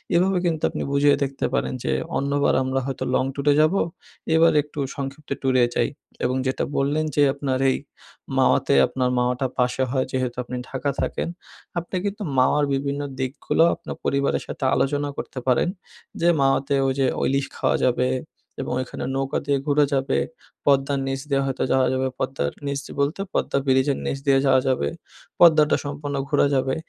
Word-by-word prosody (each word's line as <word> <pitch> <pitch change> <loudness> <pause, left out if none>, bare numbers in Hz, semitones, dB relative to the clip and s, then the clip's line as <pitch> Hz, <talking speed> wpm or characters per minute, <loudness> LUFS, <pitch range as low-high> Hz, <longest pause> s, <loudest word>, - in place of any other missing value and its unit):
এভাবে 185 +2 +3
কিন্তু 160 -3 -1
আপনি - - -4
বুঝিয়ে 145 0 +4
দেখতে 135 0 -2
পারেন 140 - 0
যে, - - 0 0.3
"অন্যবার 140 +1 +1
আমরা 130 +1 0
হয়তো 135 -2 -3
লং - - +2
ট্যুরে 145 +1 +2
যাবো, 165 +6 +3 0.5
এবার 165 0 +5
একটু 150 0 -10 0.2
সংক্ষিপ্ত 140 +2 -6
ট্যুরে 130 -2 +3
যাই।" - - +2 0.3
এবং 125 +1 +1
যেটা 130 - -1
বললেন 145 +3 +1
যে 145 - +3
আপনার 135 -2 -2
এই - - 0 0.6
মাওয়াতে - - +3
আপনার 130 -1 -1
মাওয়াটা 125 +2 0
পাশে 125 +1 +1
হয়, 130 -1 +1
যেহেতু 130 -2 -1
আপনি 125 - -6
ঢাকা 135 +2 -2
থাকেন। - - -2 0.5
আপনি 170 +3 -7
কিন্তু 205 +1 -3
মাওয়ার 145 +3 +4
বিভিন্ন 140 +1 -1 0.2
দিকগুলো, 130 +4 +1
আপনার - - -8
পরিবারের 140 0 +1
সাথে - - -6
আলোচনা 145 +1 +1
করতে 130 - -5
পারেন 125 +6 +3 0.5
যে, 170 - +3
"মাওয়াতে 135 +1 +2
ওইযে 135 0 +1
ও - - -2
ইলিশ 140 0 +1
খাওয়া - - +1
যাবে 125 0 +2 0.5
এবং 130 - -3
ওইখানে 130 - -5
নৌকা 135 0 -1
দিয়ে 140 -1 +2
ঘুরা 145 0 +4
যাবে, 135 0 +1 0.5
পদ্মার 140 0 +3
নিচ 135 0 -2
দিয়ে 140 0 +2
হয়তো 135 -1 -2
যাওয়া 130 -1 +3
যাবে। 130 0 0
পদ্মার 70 - -1
নিচ 140 -1 -1 0.2
বলতে 145 +7 0
পদ্মা - - 0
ব্রিজের 130 +1 +2
নিচ 140 - -1
দিয়ে 135 -1 +5
যাওয়া 130 -1 +5
যাবে। 130 - +1 0.5
পদ্মাটা 155 -3 +6
সম্পূর্ণ 145 0 -4
ঘুরা 145 - +3
যাবে।" 130 0 +1
140 Hz, 170 wpm, -23 LUFS, 130-145 Hz, 0.6 s, পদ্মাটা